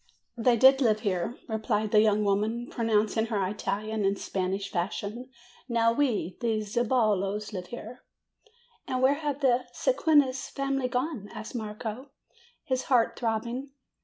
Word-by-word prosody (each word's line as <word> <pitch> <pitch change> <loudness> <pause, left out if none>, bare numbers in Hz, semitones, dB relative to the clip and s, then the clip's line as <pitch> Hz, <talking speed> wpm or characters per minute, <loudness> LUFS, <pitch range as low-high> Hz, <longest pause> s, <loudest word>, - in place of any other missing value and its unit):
"They 240 0 +3
did 265 +3 +6
live 215 -4 +3
here," 195 +1 -1
replied 215 -1 -1
the 210 - +6
young 215 -1 +3
lady, 215 +4 0
pro 235 - -3
nouncing 220 0 +2
her 205 -4 0
Italian 210 +2 -2
in 195 0 +2
Spanish 195 0 -3
fashion. 205 +7 -3 0.4
"Now 230 -1 +3
we, 230 - 0
the 220 -2 0
Zeballos, 210 -2 0
live 180 -2 -5
here." 240 +2 -9 0.9
"And 255 0 -1
where 265 +2 +6
have 290 -1 -3
the 255 -2 +3
Mequinez 290 - +2
family 275 -2 -1
gone?" 250 -4 -3
asked 215 - -8
Marco, 220 +3 -5 0.5
his 260 -1 -1
heart 245 -4 +3
throbbing. 235 +4 -3
225 Hz, 140 wpm, -28 LUFS, 210-255 Hz, 0.9 s, did